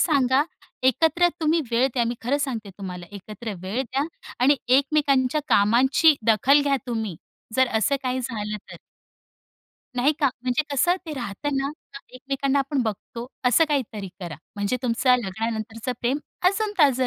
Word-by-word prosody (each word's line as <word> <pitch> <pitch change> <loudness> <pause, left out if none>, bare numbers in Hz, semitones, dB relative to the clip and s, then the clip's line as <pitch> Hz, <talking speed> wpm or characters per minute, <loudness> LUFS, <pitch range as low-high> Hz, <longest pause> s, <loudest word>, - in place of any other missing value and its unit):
सांगा 275 -4 +3 0.4
एकत्र 320 +7 +3
तुम्ही 320 +1 +2
वेळ 235 +3 +3
द्या, 240 -2 +2
मी 235 +1 -1
खरं 275 +5 +1
सांगते 230 -8 -3
तुम्हाला. 180 -2 -6
एकत्र 210 +2 -7
वेळ 210 +8 -2
द्या 270 +3 -2 0.4
आणि 280 +2 +5
एकमेकांच्या 275 0 +3
कामाची 255 +9 +5
दखल 270 +7 +5
घ्या 280 -1 +2
तुम्ही. 220 -8 -3 0.4
जर 260 -1 +4
असं 280 +6 +2
काही 255 0 -1
झालं 215 -4 -3
तर. - - -8 1.2
नाही 275 +5 +3
का 280 - +4 0.2
म्हणजे 255 +4 +1
कसं 350 +7 +3
ते 310 - -4
राहतं 270 +3 -3
ना 275 +1 0 0.4
एकमेकांना 275 +2 -1
आपण 275 -1 0
बघतो. 230 +2 -5 0.2
असं 250 +7 +5
काहीतरी 225 -9 -2
करा. 170 -4 -6 0.2
म्हणजे 205 +5 0
तुमचं 250 +1 +3
लग्नानंतरच 225 +4 -3
प्रेम 255 +4 +1 0.3
अजून 415 +2 -1
ताजं 260 -5 +4
255 Hz, 150 wpm, -24 LUFS, 225-280 Hz, 1.2 s, आणि